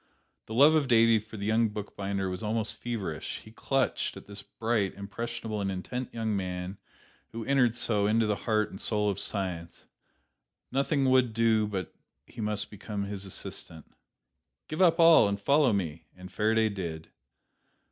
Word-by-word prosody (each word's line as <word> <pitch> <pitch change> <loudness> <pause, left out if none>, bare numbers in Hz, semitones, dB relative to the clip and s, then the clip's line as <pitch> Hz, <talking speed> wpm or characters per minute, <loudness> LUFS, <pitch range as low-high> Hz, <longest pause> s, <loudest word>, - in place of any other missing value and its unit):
The 110 - -5
love 145 +5 +7
of 155 -3 +2
Davy 115 -2 +5
for 110 +1 -11
the 100 - -4
young 110 +1 +3
bookbinder 100 -2 -3
was 90 0 -4
almost 110 0 -1
feverish: 105 -10 -4
he 110 - -12
clutched 135 +3 -1
at - - -11
this 100 -1 -8
bright, 110 -4 -1
impressionable 110 +2 -5
and 100 - -1
intent 120 +7 -4
young 110 -2 -2
man 90 0 -4 0.5
who 115 -1 -6
entered 130 -4 +3
so 110 -4 +1
into 110 +1 +3
the 105 -1 +1
heart 110 0 0
and 95 - -8
soul 105 -2 +2
of 95 - -5
science; 90 -4 -4 0.9
nothing 140 +1 +1
would 130 -3 +4
do 110 -1 +3
but 95 -3 -4 0.3
he - - -9
must 105 0 -2
become 105 0 -5
his 100 -1 -6
assistant. 80 -3 -8 0.7
"Give 155 +3 -3
up 170 -2 +5
all 165 -9 +7
and 100 0 -2
follow 140 +4 +4
me!" 85 -6 -3
And 90 0 -10
Faraday 110 +2 +2
did. 85 -5 -5
110 Hz, 165 wpm, -29 LUFS, 100-115 Hz, 0.9 s, love